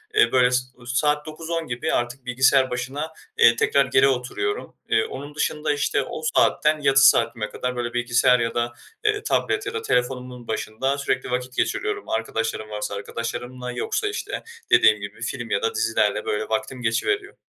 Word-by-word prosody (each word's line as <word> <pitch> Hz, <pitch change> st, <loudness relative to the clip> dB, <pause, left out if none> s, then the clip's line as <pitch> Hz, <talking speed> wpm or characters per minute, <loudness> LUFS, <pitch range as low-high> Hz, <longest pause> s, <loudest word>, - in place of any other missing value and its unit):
Eee, 430 Hz, -, +5 dB
böyle 125 Hz, -1 st, +4 dB
s 125 Hz, 0 st, +2 dB
u 120 Hz, -1 st, -17 dB
saat 150 Hz, +4 st, +1 dB
21.00-22.00 165 Hz, +1 st, -4 dB
gibi 120 Hz, 0 st, -2 dB
artık 120 Hz, +2 st, -2 dB
bilgisayar 130 Hz, +1 st, +3 dB
başına, 135 Hz, +6 st, -4 dB, 0.3 s
eee, 115 Hz, 0 st, +7 dB
tekrar 140 Hz, +3 st, +3 dB
geri 130 Hz, +1 st, +4 dB
oturuyorum. 135 Hz, -, -2 dB
Eee, 425 Hz, +1 st, +3 dB
onun 145 Hz, -, -7 dB
dışında, 150 Hz, 0 st, 0 dB
işte, 145 Hz, +1 st, 0 dB
o 155 Hz, -, -6 dB, 0.2 s
saatten, 150 Hz, 0 st, +3 dB
yatış 135 Hz, -1 st, +5 dB
saatime 115 Hz, -4 st, +3 dB
kadar 125 Hz, 0 st, -3 dB
böyle 120 Hz, -1 st, -3 dB
bilgisayar 120 Hz, +1 st, +3 dB
ya 115 Hz, 0 st, -1 dB
da, 120 Hz, 0 st, -1 dB, 0.3 s
eee, 420 Hz, -1 st, +1 dB
tablet 415 Hz, 0 st, 0 dB
ya 405 Hz, -, -4 dB
da 450 Hz, -, -2 dB
telefonumun 125 Hz, -, -2 dB
başında 130 Hz, +5 st, -2 dB
sürekli 140 Hz, -2 st, -2 dB
vakit 125 Hz, 0 st, -3 dB
geçiriyorum 415 Hz, -1 st, -1 dB
arkadaşlarım 115 Hz, -1 st, -2 dB
varsa 105 Hz, -1 st, -4 dB
arkadaşlarımla 125 Hz, +4 st, -5 dB
yoksa, 125 Hz, -, -2 dB
işte, 420 Hz, -, -4 dB, 0.3 s
dediğim 105 Hz, -1 st, +6 dB
gibi 100 Hz, +2 st, -8 dB
film 120 Hz, -1 st, -4 dB
ya 100 Hz, -, 0 dB
da -, -, -1 dB
dizilerle 110 Hz, -2 st, +1 dB
böyle 105 Hz, 0 st, -1 dB
vaktim 110 Hz, +3 st, -2 dB
geçiveriyor. 400 Hz, -, -1 dB
125 Hz, 170 wpm, -23 LUFS, 120-150 Hz, 0.3 s, eee